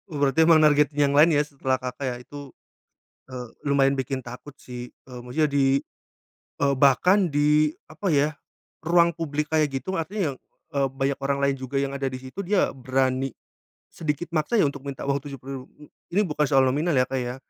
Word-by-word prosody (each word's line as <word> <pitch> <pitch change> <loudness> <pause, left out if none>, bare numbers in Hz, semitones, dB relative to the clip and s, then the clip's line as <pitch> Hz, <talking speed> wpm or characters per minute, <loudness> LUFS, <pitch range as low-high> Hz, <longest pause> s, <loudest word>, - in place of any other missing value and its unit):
Oh 155 - -6
berarti 145 +3 +3
emang 165 -2 +7
nargetin 150 -1 +3
yang - - -1
lain 150 +4 +6
ya 145 - +3
setelah 135 -3 -1
Kakak 130 +2 -5
ya 125 - -4
itu, 145 +1 -10 0.8
eee, 125 -2 -6 0.2
lumayan 140 -1 +3
bikin 135 0 -2
takut 125 +4 -10
sih, 125 -1 -8 0.2
eee, 125 -1 -8
maksudnya 150 +5 0
di, 140 -1 +2 0.8
eee, 140 -1 +3
bahkan 180 +9 +4
di 150 +1 +2 0.2
apa 160 +6 -4
ya, 150 -1 +2 0.5
ruang 170 +1 +3
publik 150 -2 -3
kayak 155 -1 +3
gitu 135 +6 -4
artinya, 180 -2 -2 0.4
eee, 140 -1 +1
banyak 135 +1 -2
orang 140 0 -1
lain 140 0 +2
juga 130 +1 -5
yang 135 0 0
ada 140 -1 -2
di 130 - -6
situ 130 +8 -8
dia 200 +1 +1
berani, 130 0 0 0.6
sedikit 155 +2 -3
maksa 155 +5 -1
ya - - +5
untuk 140 -1 -8
minta 140 -1 -6
uang 140 0 +2
Rp70.000 135 -1 -7 0.5
ini 200 - +4
bukan 150 -2 0
soal 135 -1 +4
nominal 145 +6 +1
ya 130 -1 +3
Kak 135 - -1
ya, 125 -1 -3
140 Hz, 185 wpm, -25 LUFS, 135-155 Hz, 0.8 s, emang